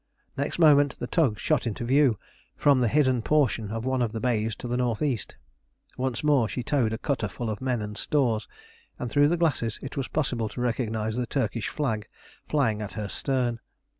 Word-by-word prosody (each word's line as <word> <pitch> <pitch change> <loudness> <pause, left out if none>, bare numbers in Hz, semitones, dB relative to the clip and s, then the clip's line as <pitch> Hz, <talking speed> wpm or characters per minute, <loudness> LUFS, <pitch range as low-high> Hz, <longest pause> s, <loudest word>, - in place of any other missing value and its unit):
Next 140 +2 -2
moment 145 -4 +5
the - - -4
tug 130 - +1
shot 150 +1 0
into 115 +1 -3
view 135 -3 +4 0.4
from 140 -3 +4
the 120 - +3
hidden 130 -2 +3
portion 125 -6 +1
of 115 +2 -4
one 130 -1 0
of 115 -2 0
the 110 - -3
bays 110 -2 0
to - - -7
the 120 - -3
N.E. 125 +1 0 0.8
Once 130 -1 -2
more 140 -7 +3
she 125 - -3
towed 120 -4 +1
a 110 - -2
cutter 125 -4 -1
full 115 +2 -4
of 105 - -6
men 125 -4 -1
and 105 0 -6
stores, 115 -3 0 0.5
and 125 - -4
through 145 0 +5
the 175 +3 +1
glasses 140 -10 0
it 135 - -6
was 135 -3 -2
possible 125 -7 -1
to 105 - -8
recognise 110 -2 -1
the 125 -1 -1
Turkish 115 -4 -1
flag 110 -8 -2 0.4
flying 115 -8 +1
at 105 - -5
her 105 -1 -4
stern. 125 +1 -1
125 Hz, 195 wpm, -26 LUFS, 110-140 Hz, 0.8 s, moment